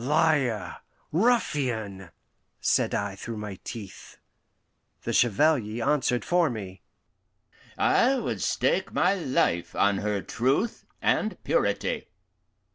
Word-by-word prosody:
"Liar 145 -5 +1 0.3
ruffian!" 130 - 0 0.5
said - - +1
I 100 -1 -2
through 115 +3 -6
my 105 -3 -6
teeth. 105 -5 -9 0.9
The - - -2
Chevalier 120 -2 +2
answered 130 -4 +1
for 175 -2 +3
me: 95 -6 -7 1.0
"I 260 +3 +3
would 245 - -3
stake - - +1
my 180 +2 +3
life 130 - 0
on 100 -1 +2
her 105 -2 -1
truth 135 - -1 0.2
and - - +1
purity." - - 0
120 Hz, 105 wpm, -27 LUFS, 100-160 Hz, 1.0 s, for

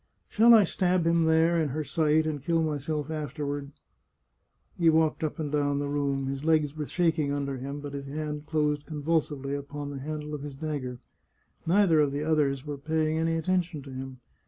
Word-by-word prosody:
" - - -45
Shall 230 +2 +7
I 215 - +7
stab 180 -1 +1
him 165 0 +3
there, 160 +1 +3
in 155 - 0
her 155 +4 -2
sight, 155 0 +2
and 150 -3 -2
kill 165 +3 +1
myself 150 0 -2
after 150 -1 -4
ward? 140 0 -4 0.5
" - - -43
He 170 -1 +5
walked 160 0 +2
up 155 - -2
and 150 -3 -3
down 145 -1 +1
the 145 0 -1
room; 140 -1 -1
his 135 +1 -4
legs 155 -2 +2
were 150 -2 -4
shaking 165 -5 +1
under 140 -1 -2
him, 140 +3 -5
but 145 -1 -7
his 140 -1 -6
hand 150 +1 -5
closed 150 -2 0
convulsively 150 -3 -1
upon 145 0 -5
the 140 - -6
handle 150 +1 -5
of 150 - -4
his 145 -1 -7
dagger. 140 -4 -4 0.7
Neither 175 -3 +4
of 145 -2 +3
the 145 +2 -2
others 145 -3 +1
were 145 -2 -5
pay 155 +1 0
ing 160 - 0
any 165 0 +1
attention 175 -2 -1
to 135 - -10
him. 130 -1 -7
150 Hz, 205 wpm, -28 LUFS, 140-160 Hz, 0.7 s, Shall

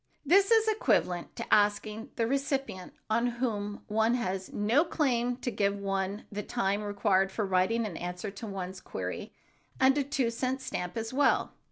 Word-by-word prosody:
This 390 +6 +5
is 450 -1 +5
equivalent 180 - +1
to - - -2
asking 210 +1 +2
the 230 - +1
recipient 270 - -2
on 230 +3 +2
whom 210 -4 -2
one 220 +3 +2
has 190 -5 -3
no 225 +9 +3
claim 245 -7 0
to 250 - -3
give 200 -2 0
one 195 +1 -2
the 205 0 -3
time 205 -2 -1
required 200 -2 +1
for 210 +1 -1
writing 195 +5 +2
an 200 -6 -5
answer 180 +3 -4
to 205 +3 -8
one's 190 -1 -5
query, - - -5 0.5
and 265 0 +5
a - - +2
two 265 -4 0
cent 255 +3 -1
stamp 180 -8 -4
as 225 +2 -3
well. 285 +2 +2
215 Hz, 170 wpm, -30 LUFS, 195-255 Hz, 0.5 s, This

